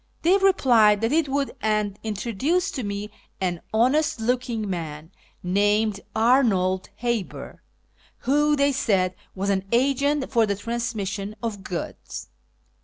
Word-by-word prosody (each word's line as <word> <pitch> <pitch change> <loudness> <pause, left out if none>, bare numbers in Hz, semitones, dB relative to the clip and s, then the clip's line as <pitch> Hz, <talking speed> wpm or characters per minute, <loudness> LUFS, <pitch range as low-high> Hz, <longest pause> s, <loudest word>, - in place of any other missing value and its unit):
They 350 +4 +5
replied 235 - +4
that 225 +2 +1
it 310 -2 +2
would, 275 0 -1
and 210 -2 0
introduced 235 - -1
to 260 - -3
me 205 +1 -4 0.3
an 175 -3 -2
honest 255 +6 +2
looking 235 -2 -1
man, 160 -3 -5 0.3
named 205 +3 +2 0.2
Arnold 220 -6 +2
Haber, 235 -4 -4 0.6
who, 295 +3 +3
they 280 0 +3
said, 195 -9 +1 0.2
was 200 +1 0
an 190 -1 0
agent 275 +3 +1
for 230 -4 +3
the 200 - 0
trans 235 +3 -3
mission 200 0 -4
of 210 -4 -4
goods. 180 -3 -6
220 Hz, 130 wpm, -24 LUFS, 200-265 Hz, 0.6 s, They